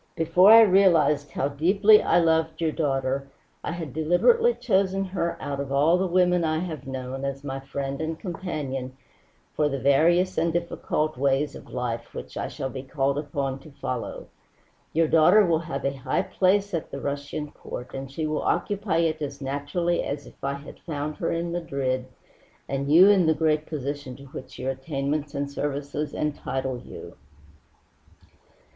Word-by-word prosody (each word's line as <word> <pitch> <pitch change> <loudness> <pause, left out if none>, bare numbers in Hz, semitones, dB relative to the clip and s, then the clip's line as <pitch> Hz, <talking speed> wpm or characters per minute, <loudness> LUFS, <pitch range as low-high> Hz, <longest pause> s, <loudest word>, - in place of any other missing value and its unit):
Before 175 +4 +5
I 225 +1 +10
realized 175 -8 +4
how 135 - 0
deeply 195 +9 +5
I - - +3
loved 160 -1 +1
your 165 -2 +1
daughter 135 -3 -1 0.4
I - - -3
had 165 -6 -6
deliberately 450 - +3
chosen 195 0 +1
her 180 -3 -2
out 140 -1 -4
of 140 -1 -4
all 150 +6 +4
the 190 - +1
women 180 -1 +3
I 155 -1 +1
have 160 -5 -5
known, 130 0 -5
as 140 0 -4
my 135 -1 -4
friend 135 +1 -4
and 160 0 -3
companion 145 -8 -5 0.6
for 150 -1 +1
the 140 - -2
various 165 +8 +3
and 165 +1 +1
difficult 160 -3 -2
ways 140 +2 +1
of - - -12
life 120 -2 -4
which - - -8
I - - -3
shall 135 -1 -5
be 130 - -5
called 135 +1 -1
upon 140 -2 -3
to 155 - -14
follow. 130 -3 -5 0.7
Your 165 0 +2
daughter 175 +7 +6
will 165 -2 +2
have 140 -4 -5
a 135 - +1
high 130 -1 -1
place 200 +1 +1
at 165 - -3
the - - -6
Russian 145 +1 -4
Court, 125 - -8
and 135 0 -6
she 155 +3 -3
will 155 0 -1
occupy 200 -4 0
it 160 -2 0
as 140 -1 -4
naturally 145 +6 -1
as 140 0 -4
if - - -17
I 140 0 0
had 140 +1 -11
found 150 -2 -4
her - - -1
in 170 +1 -2
Madrid 140 -7 -2 0.6
and 140 +1 -2
you 175 +5 +8
in 190 -5 +4
the 160 - +4
great 155 -1 +1
position 145 -3 -5
to 140 - -13
which 130 0 -9
your 130 +1 -2
attainments 140 +2 -3
and 140 0 -1
services 145 +1 -3
entitle 135 -4 -2
you." - - -11
150 Hz, 175 wpm, -25 LUFS, 135-170 Hz, 0.7 s, I